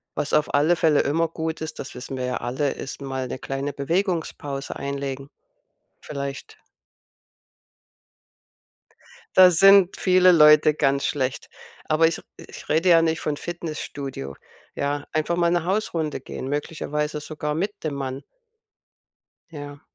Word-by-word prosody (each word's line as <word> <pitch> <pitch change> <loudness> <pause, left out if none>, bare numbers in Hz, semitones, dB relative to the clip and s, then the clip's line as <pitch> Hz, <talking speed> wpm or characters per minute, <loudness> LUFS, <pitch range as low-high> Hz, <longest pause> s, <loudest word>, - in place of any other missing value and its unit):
was 145 - -2
auf 150 - +2
alle 155 +5 +4
Fälle 155 -3 +3
immer 165 +3 +1
gut 160 0 -4
ist, 160 0 -6
das 135 - -7
wissen 130 +1 -6
wir 125 - -2
ja 125 - -2
alle, 130 +4 -1
ist 135 - -7
mal 130 -1 -4
'ne 130 - -6
kleine 135 +1 -4
Bewegungspause 155 -3 -2
einlegen. 140 0 -5 0.7
Vielleicht 140 -1 -7 2.8
Da 185 -1 +9
sind 195 +1 +6
viele 185 -1 +5
Leute 150 -1 +6
ganz 140 -2 +1
schlecht, 135 -3 -2 0.4
aber 160 +1 +3
ich 165 - -3
r - - -13
ich - - -12
rede 165 +4 +2
ja 165 -1 +7
nicht 160 -1 0
von 150 -1 -2
Fitnessstudio, 145 - -6 0.4
ja? 145 0 -2
Einfach 155 +2 0
mal 170 0 +2
'ne 175 -2 +1
Hausrunde 170 -7 -1
gehen, 130 0 -7
möglicherweise 150 0 -3
sogar 150 0 -4
mit 195 +6 -1
dem 150 -2 -2
Mann. 135 0 -4 1.3
Ja. 145 -2 -9
150 Hz, 140 wpm, -24 LUFS, 140-165 Hz, 2.8 s, Da